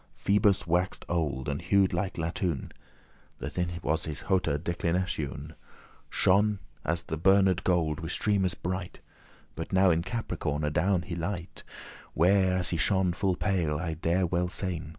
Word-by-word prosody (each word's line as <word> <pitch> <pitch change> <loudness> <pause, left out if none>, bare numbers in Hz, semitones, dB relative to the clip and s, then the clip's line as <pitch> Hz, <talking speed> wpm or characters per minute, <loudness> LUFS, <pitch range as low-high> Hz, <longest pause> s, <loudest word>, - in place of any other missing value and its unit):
Phoebus 100 0 +2
wax'd 90 +2 0
old, 75 -6 -1
and 70 +1 -2
hued 95 +2 +3
like 90 +2 -1
latoun,* 85 -2 -2 0.7
*brass - - -6
That 90 - -1
in 90 - 0
his 80 -2 -2
hote 95 -2 +1
declinatioun 80 -1 -2 0.6
Shone 105 +2 +3 0.3
as 85 +2 -1
the 80 - -4
burned 95 +1 +4
gold, 80 -4 +1
with 80 +1 -4
streames* 100 -2 +1
bright; 90 0 -3
*beams - - -20 0.5
But - - -6
now 95 0 +5
in 80 0 +2
Capricorn 85 -7 -3
adown 85 +4 +1
he 90 - -6
light, 85 0 -4 0.5
Where 95 +2 +4
as 90 -1 -1
he 85 - -1
shone 95 0 +2
full 95 0 0
pale, 90 -7 0
I 80 0 -3
dare 85 +3 +1
well 90 +1 0
sayn. 90 -5 -3
90 Hz, 155 wpm, -28 LUFS, 80-95 Hz, 0.7 s, now